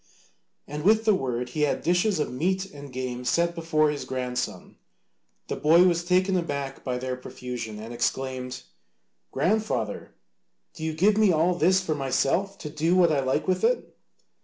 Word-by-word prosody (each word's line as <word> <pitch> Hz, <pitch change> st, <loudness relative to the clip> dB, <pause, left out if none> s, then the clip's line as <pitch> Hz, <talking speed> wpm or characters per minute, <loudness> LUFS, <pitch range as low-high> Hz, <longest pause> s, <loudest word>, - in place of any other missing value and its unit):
And 150 Hz, +1 st, -5 dB
with 220 Hz, +4 st, +4 dB
the 215 Hz, -, +5 dB
word 125 Hz, -7 st, -2 dB
he 150 Hz, -, -3 dB
had 150 Hz, -, +1 dB
dishes 180 Hz, +4 st, +2 dB
of 150 Hz, -, -2 dB
meat 185 Hz, +8 st, 0 dB
and 145 Hz, -1 st, -10 dB
game 125 Hz, -1 st, -4 dB
set 170 Hz, +7 st, +1 dB
before 155 Hz, -3 st, +1 dB
his 145 Hz, -, -4 dB
grandson. 125 Hz, -1 st, -4 dB, 0.7 s
The -, -, -3 dB
boy 165 Hz, +4 st, +5 dB
was 170 Hz, -2 st, +2 dB
taken 185 Hz, +2 st, +2 dB
aback 140 Hz, -6 st, -3 dB
by 125 Hz, -2 st, -2 dB
their 130 Hz, 0 st, -3 dB
profusion, 125 Hz, -3 st, -7 dB
and 110 Hz, +3 st, -8 dB
exclaimed, 130 Hz, +1 st, -2 dB, 0.7 s
"Grandfather, 215 Hz, +10 st, -1 dB, 0.6 s
do 160 Hz, -, -9 dB
you 160 Hz, -1 st, -2 dB
give 200 Hz, +6 st, +3 dB
me 215 Hz, -3 st, +5 dB
all 165 Hz, +2 st, +3 dB
this 180 Hz, +2 st, +3 dB
for 165 Hz, -4 st, -1 dB
myself, 150 Hz, +8 st, 0 dB
to 150 Hz, -, -7 dB
do 160 Hz, +3 st, +1 dB
what 175 Hz, -3 st, +5 dB
I 145 Hz, -, +2 dB
like 130 Hz, -1 st, 0 dB
with 185 Hz, -, 0 dB
it?" 485 Hz, +1 st, 0 dB
155 Hz, 170 wpm, -26 LUFS, 130-180 Hz, 0.7 s, the